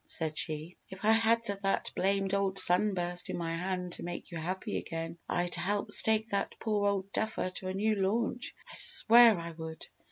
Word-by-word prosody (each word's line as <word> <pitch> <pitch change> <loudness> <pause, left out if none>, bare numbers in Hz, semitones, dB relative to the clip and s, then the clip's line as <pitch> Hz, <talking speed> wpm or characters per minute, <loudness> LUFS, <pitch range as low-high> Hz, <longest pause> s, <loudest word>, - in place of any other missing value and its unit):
said 160 -2 -2
she. 155 +2 -4
"If 190 +2 -9
I 220 - +5
had 225 +1 +2
that 200 -1 -2
blamed 195 0 -1
old 195 -1 -1
sunburst 180 -2 +2
in - - -4
my 165 -1 -3
hand 180 0 -4
to - - -6
make 175 0 -7
you 170 - -6
happy 185 +4 -4
again, 165 0 -7
I'd 175 0 -2
help 205 +1 -1
stake 220 0 +3
that 200 -1 -3
poor 210 -2 -1
old 195 -1 -3
duffer 220 -4 -2
to 185 - -6
a 185 - -3
new 215 +2 0
launch! 225 +5 -2
I - - -14
swear 230 -2 +7
I 170 0 -7
would!" 160 0 -9
190 Hz, 190 wpm, -30 LUFS, 175-210 Hz, -, swear